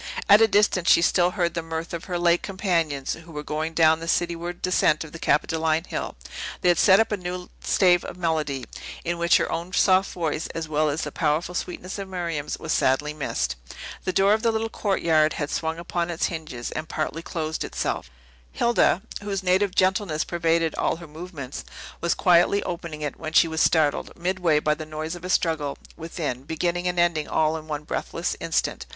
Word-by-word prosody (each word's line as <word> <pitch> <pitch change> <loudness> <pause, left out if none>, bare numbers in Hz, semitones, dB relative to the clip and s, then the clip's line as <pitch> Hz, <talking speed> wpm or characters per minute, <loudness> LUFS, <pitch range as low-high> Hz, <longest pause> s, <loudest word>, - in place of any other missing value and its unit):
At 205 +1 +8
a 225 - +7
distance, 200 -4 +3
she 170 - +6
still 175 0 +3
heard 170 -2 +1
the 170 - -2
mirth 165 +1 -5
of 170 - -5
her 180 -2 -2
late 175 0 +3
companions, 170 -8 -1
who 165 +1 -11
were 150 -1 -5
going 155 +2 -3
down 160 -1 +5
the 165 - -7
cityward 175 +1 -1
descent 165 -4 +2
of 160 - -11
the 165 - -9
Capitoline 160 +1 +1
Hill; - - -5 0.5
they 180 - +3
had 175 - +3
set 190 +1 +6
up 225 0 +2
a 210 - 0
new 180 -1 -6
stave 180 -2 +4
of - - -8
melody, 155 -6 -1 0.4
in 170 0 -2
which 170 0 +5
her - - -1
own 170 +2 -3
soft 190 -1 +4
voice, 165 -2 -2
as 165 -1 -3
well 155 0 +1
as 150 +2 -2
the - - -4
powerful 160 +3 0
sweetness 180 +2 -5
of 195 - -5
Miriam's, 170 -5 -3
was - - -2
sadly 145 +3 +1
missed. 100 - -2 0.5
The 185 - 0
door 195 +2 +4
of 220 - +1
the 230 - +2
little 225 0 -1
courtyard 165 -8 +2
had 145 -1 -3
swung 160 0 -2
upon 170 0 -2
its 170 -1 0
hinges, 155 -8 -5
and 155 - -5
partly 155 +1 -3
closed 160 -2 -3
itself. - - -3 0.4
Hilda 235 -5 +2 0.2
(whose 200 -2 -3
native 185 +1 +2
gentleness 185 -4 +2
pervaded 165 -1 +1
all - - +1
her 170 +1 -10
movements) 155 -4 -7 0.4
was 170 - +1
quietly 180 +3 +4
opening 170 -3 -5
it, 145 - -4
when 160 0 -5
she 170 - +6
was 160 0 -1
startled, 155 -3 +2
midway, 175 -3 +1
by 150 0 +1
the 155 +1 -6
noise 155 +1 -5
of 175 -1 -9
a 185 - -5
struggle 160 -6 0 0.2
within, 160 -6 -4
beginning 170 +4 -2
and 180 0 -1
ending 170 -3 +2
all 155 0 +1
in 155 -1 -7
one 150 -1 -4
breathless - - -3
instant. - - -1
170 Hz, 200 wpm, -25 LUFS, 155-180 Hz, 0.5 s, At